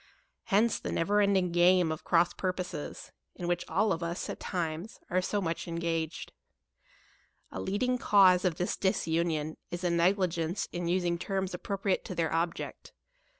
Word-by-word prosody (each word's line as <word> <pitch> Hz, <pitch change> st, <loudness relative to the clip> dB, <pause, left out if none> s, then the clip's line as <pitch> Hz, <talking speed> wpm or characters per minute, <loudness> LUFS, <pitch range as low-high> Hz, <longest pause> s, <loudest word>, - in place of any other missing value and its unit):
Hence 215 Hz, +3 st, +2 dB
the -, -, -4 dB
never 205 Hz, +5 st, +2 dB
ending 190 Hz, -3 st, +2 dB
game 175 Hz, -1 st, +4 dB
of 155 Hz, -, -5 dB
cross 170 Hz, -1 st, +3 dB
purposes, 185 Hz, -5 st, -4 dB, 0.2 s
in 175 Hz, -, -5 dB
which 175 Hz, 0 st, 0 dB
all 195 Hz, +5 st, +2 dB
of 165 Hz, -, -4 dB
us, 170 Hz, +2 st, -3 dB
at -, -, -8 dB
times, 170 Hz, +3 st, -4 dB
are 185 Hz, +1 st, +2 dB
so 205 Hz, +3 st, -1 dB
much 170 Hz, -3 st, -3 dB
engaged. 165 Hz, -1 st, -3 dB, 1.2 s
A -, -, -5 dB
leading 250 Hz, +6 st, 0 dB
cause 185 Hz, -5 st, +5 dB
of 180 Hz, -4 st, +1 dB
this 180 Hz, -, -1 dB
disunion 160 Hz, -4 st, 0 dB
is 175 Hz, +1 st, -5 dB
a 175 Hz, -, +1 dB
negligence 175 Hz, 0 st, +1 dB
in 175 Hz, -1 st, -3 dB
us 180 Hz, +1 st, +1 dB
ing 170 Hz, -1 st, 0 dB
terms 190 Hz, 0 st, -2 dB
appropriate 195 Hz, +1 st, -1 dB
to 185 Hz, -, -5 dB
their 165 Hz, -2 st, 0 dB
object. 165 Hz, +1 st, -3 dB
175 Hz, 160 wpm, -30 LUFS, 170-190 Hz, 1.2 s, cause